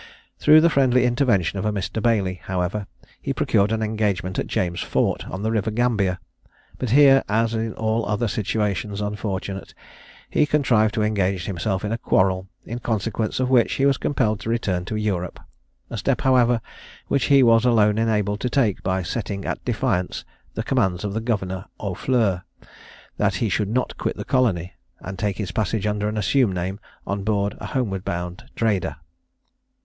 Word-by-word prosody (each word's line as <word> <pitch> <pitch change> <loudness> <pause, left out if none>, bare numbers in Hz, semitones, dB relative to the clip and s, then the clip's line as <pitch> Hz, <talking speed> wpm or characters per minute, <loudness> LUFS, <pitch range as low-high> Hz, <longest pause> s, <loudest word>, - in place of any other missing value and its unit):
Through 155 +1 +7
the 170 - +5
friendly 130 -3 +3
intervention 120 - +1
of 95 - -3
a 105 - +1
Mr. 105 +2 -3
Bailey, 100 -5 +1
however, 95 +2 -2 0.3
he - - -2
procured 100 +2 +2
an 110 0 0
engagement 105 -4 -1
at - - -2
James 85 -2 -1
Fort, - - -1
on 95 +3 -5
the 110 - 0
river 110 -2 0
Gambia, 105 -5 +1 0.6
but 125 - -2
here, 135 +1 +6
as 115 +2 +1
in 110 0 -2
all 110 +1 0
other 105 +3 0
situations 105 -1 -1
unfortunate, 100 -2 -4 0.5
he 150 - +2
contrived 115 -8 +2
to 110 - +1
engage 100 -4 0
himself 95 +1 -2
in 105 - -2
a 115 - -2
quarrel, 95 -2 +1 0.2
in 120 +2 -5
consequence 110 -1 -2
of 130 0 0
which 120 -3 +4
he 135 - +1
was 140 -1 +3
compelled 110 -7 0
to 105 - -5
return 95 -6 -1
to 110 - -4
Europe 100 -5 -2 0.5
a - - -4
step, - - 0
however, 125 -3 +3 0.5
which 135 - +1
he 140 -2 +5
was 115 -1 +5
alone 110 -3 +3
enabled 105 -2 +1
to 125 - -1
take 120 -7 +1
by 95 0 -1
setting 100 +2 -4
at - - -3
defiance 90 0 -1 0.3
the - - -2
commands 95 0 0
of 100 -1 -3
the 110 - -2
Governor 95 -5 -2
Aufleur, 100 -1 0 0.8
that 100 -2 +1
he 110 +3 0
should 100 +1 0
not 125 +4 -1
quit - - -2
the - - -5
colony 95 -9 +1 0.3
and 95 0 -7
take 105 -2 -1
his 100 -4 -3
passage 105 +1 -1
under 105 0 0
an 105 - -4
assumed 105 0 +2
name 95 +3 -3 0.3
on 100 0 -3
board 100 -1 0
a - - -6
homeward 100 -8 -2
bound 90 0 -4
trader. 105 -5 0
105 Hz, 175 wpm, -23 LUFS, 95-115 Hz, 0.8 s, Through